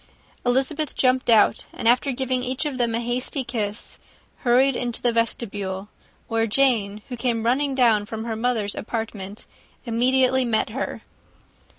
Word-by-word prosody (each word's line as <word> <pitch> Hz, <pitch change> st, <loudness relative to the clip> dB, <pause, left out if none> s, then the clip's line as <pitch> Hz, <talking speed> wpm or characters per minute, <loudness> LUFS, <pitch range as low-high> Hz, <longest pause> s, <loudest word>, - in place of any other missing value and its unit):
Elizabeth 270 Hz, +4 st, +1 dB
jumped 255 Hz, -1 st, +2 dB
out; 220 Hz, -3 st, +4 dB
and -, -, -3 dB
after 250 Hz, +4 st, +3 dB
giving 255 Hz, 0 st, -1 dB
each 255 Hz, +3 st, -2 dB
of 275 Hz, -4 st, -3 dB
them 235 Hz, -2 st, +1 dB
a -, -, 0 dB
hasty 250 Hz, +3 st, -1 dB
kiss, 215 Hz, -4 st, -3 dB, 0.4 s
hurried 255 Hz, +2 st, +3 dB
into 240 Hz, -2 st, -2 dB
the 240 Hz, -, +1 dB
vestibule, 205 Hz, -4 st, -2 dB, 0.4 s
where 225 Hz, 0 st, +1 dB
Jane, 215 Hz, -4 st, +1 dB
who 250 Hz, -, -4 dB
came 230 Hz, -1 st, -1 dB
running 270 Hz, +3 st, +1 dB
downstairs 225 Hz, -5 st, +3 dB
from 220 Hz, 0 st, -5 dB
her 225 Hz, -1 st, -3 dB
mother's 225 Hz, -3 st, 0 dB
apartment, 215 Hz, -3 st, -5 dB, 0.4 s
immediately 255 Hz, +2 st, +3 dB
met 220 Hz, -2 st, 0 dB
her. 265 Hz, +5 st, -4 dB
240 Hz, 150 wpm, -23 LUFS, 220-255 Hz, 0.4 s, out